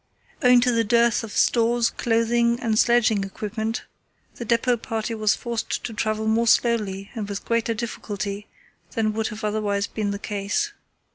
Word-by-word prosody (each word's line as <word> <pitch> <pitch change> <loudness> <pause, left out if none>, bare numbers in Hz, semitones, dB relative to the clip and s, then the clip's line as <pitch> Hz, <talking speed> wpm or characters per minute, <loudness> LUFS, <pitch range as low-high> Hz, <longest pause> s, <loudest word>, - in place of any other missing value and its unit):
Owing 250 -1 +6
to 250 0 +3
the 230 -1 +2
dearth 235 +1 +3
of 220 - -7
stores, 235 +1 +2
clothing, 235 +1 +1
and 225 -3 +1
sledging 225 -4 +3
equipment, 220 +3 -4 0.5
the 235 - -5
depot 235 +2 +2
party 225 0 -3
was 215 -1 +2
forced 235 -1 -3
to 230 - -5
travel 215 0 -1
more 225 +2 +2
slowly 210 -5 +1
and 210 -3 -5
with 200 -1 -5
greater 230 0 0
difficulty 205 -3 -5 0.5
than 215 -2 0
would 220 0 -1
have 215 +1 -7
otherwise 205 -1 0
been 210 -1 -3
the 200 - -2
case. 205 - -2
225 Hz, 160 wpm, -24 LUFS, 210-235 Hz, 0.5 s, Owing